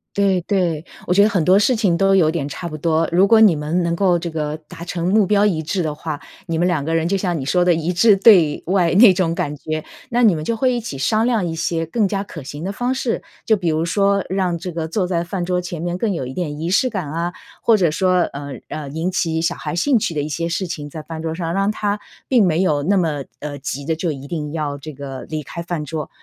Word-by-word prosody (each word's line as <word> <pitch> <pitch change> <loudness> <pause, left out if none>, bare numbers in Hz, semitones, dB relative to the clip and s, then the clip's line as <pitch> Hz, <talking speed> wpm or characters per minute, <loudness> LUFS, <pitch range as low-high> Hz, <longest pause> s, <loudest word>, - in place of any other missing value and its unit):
对 195 -2 +2
对， 175 -4 0 0.2
我 - - +1
觉 200 - +5
得 215 - +4
很 185 -7 0
多 190 +2 +6
事 250 +4 +3
情 200 -7 +2
都 195 +1 +3
有 160 -4 +4
点 145 -4 -3
差 170 +4 -6
不 155 - -6
多。 160 +1 +1
如 185 +3 +4
果 225 +1 +6
你 210 -7 +6
们 155 +4 -1
能 170 0 0
够 180 -2 +3
这 170 0 -5
个 155 -1 -3
达 170 - -9
成 175 0 -3
目 210 +2 +4
标 205 +1 +3
一 165 -6 +1
致 175 +3 -2
的 155 -1 -2
话， 150 -1 -5 0.3
你 165 -1 -1
们 175 +2 +2
2 160 -6 0
个 165 +2 -1
人 165 +1 +1
就 195 - +1
像 180 -4 -1
你 130 - -4
说 180 +5 +2
的 175 -1 +4
一 165 +2 -1
致 210 +3 +5
对 185 -8 +5
外 180 -2 +2
那 210 -2 +8
种 175 -2 0
感 150 -2 -2
觉。 155 +2 -4 0.3
那 240 0 +1
你 210 -5 +6
们 155 -1 -3
就 230 - -1
会 255 +1 +2
一 240 - 0
起 215 - -6
商 215 +12 +1
量 225 -7 +1
一 165 -1 -3
些 165 0 -1
更 205 +4 +1
加 195 0 -2
可 165 -5 -9
行 145 +3 -8
的 195 - -2
方 245 +5 -1
式， 250 -3 -1 0.2
就 220 - +4
比 175 -4 -1
如 160 +1 0
说 200 +2 +2
让 185 -2 0
这 180 +2 -6
个 160 -1 -3
坐 185 +3 -1
在 170 -2 -1
饭 175 0 -3
桌 180 0 0
前 175 -2 -6
面 175 0 -2
更 215 +1 0
有 165 -8 -3
一 130 - -6
点 150 -4 -4
仪 170 +3 -2
式 255 +6 +3
感 190 -9 -4
啊， 170 +2 -2 0.3
或 225 -2 +4
者 175 -5 +2
说， 185 +1 +2
呃， 140 0 -6 0.2
呃， 150 -2 -5
引 160 +6 -2
起 165 -3 0
小 170 +1 +1
孩 - - -5
兴 245 +7 +3
趣 170 - -2
的 145 - 0
一 - - -3
些 165 +3 -2
事 185 +3 -1
情 155 -4 -6
在 155 +1 -8
饭 160 0 -7
桌 160 0 -3
上， 165 -1 -3
让 195 +2 +1
他 205 -1 -2 0.3
并 240 -7 +4
没 165 +2 +2
有 150 -6 +1
那 195 +6 +2
么， 150 -6 -1
呃， 145 -1 -6
急 140 0 -5
着 160 0 0
就 165 0 -2
一 135 -1 -7
定 150 -1 -4
要 150 -3 -2
这 155 +3 -8
个 135 -1 -7
离 155 -1 -3
开 170 - -7
饭 170 -3 -4
桌。 155 -1 -5
170 Hz, 290 characters per minute, -20 LUFS, 155-195 Hz, 0.3 s, 那